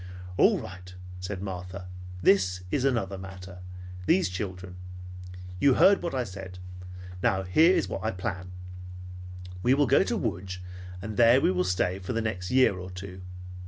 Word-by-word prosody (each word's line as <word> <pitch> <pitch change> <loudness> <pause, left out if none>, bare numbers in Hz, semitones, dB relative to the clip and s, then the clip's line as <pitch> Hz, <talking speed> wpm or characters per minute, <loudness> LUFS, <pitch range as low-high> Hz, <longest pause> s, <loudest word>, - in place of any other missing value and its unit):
"All - - +5
right," 90 -1 -10 0.2
said 95 +1 -5
Martha. 90 0 -6 0.4
"This 95 -2 +3
is 140 -2 +1
another 100 -8 0
matter; 95 -1 -9 0.5
these 175 - +3
children. 90 -1 -6 0.8
You 135 +4 +5
heard 200 0 +6
what 170 -5 -3
I 130 - +1
said. 95 -3 -8 0.6
Now 95 +1 +2
here 160 - +5
is - - +1
what - - -5
I 110 - +1
plan. 90 -2 -4 1.1
We 125 +6 +4
will 145 +1 +3
go 120 - +5
to - - 0
Lodz 90 +1 -3 0.5
and 110 0 -5
there 120 +2 +7
we 95 - +3
will 90 0 +1
stay 90 +1 0
for 95 +5 -4
the 115 - 0
next 95 -4 -3
year 125 -8 +4
or 90 0 -7
two. 90 0 -8
95 Hz, 160 wpm, -28 LUFS, 90-115 Hz, 1.1 s, there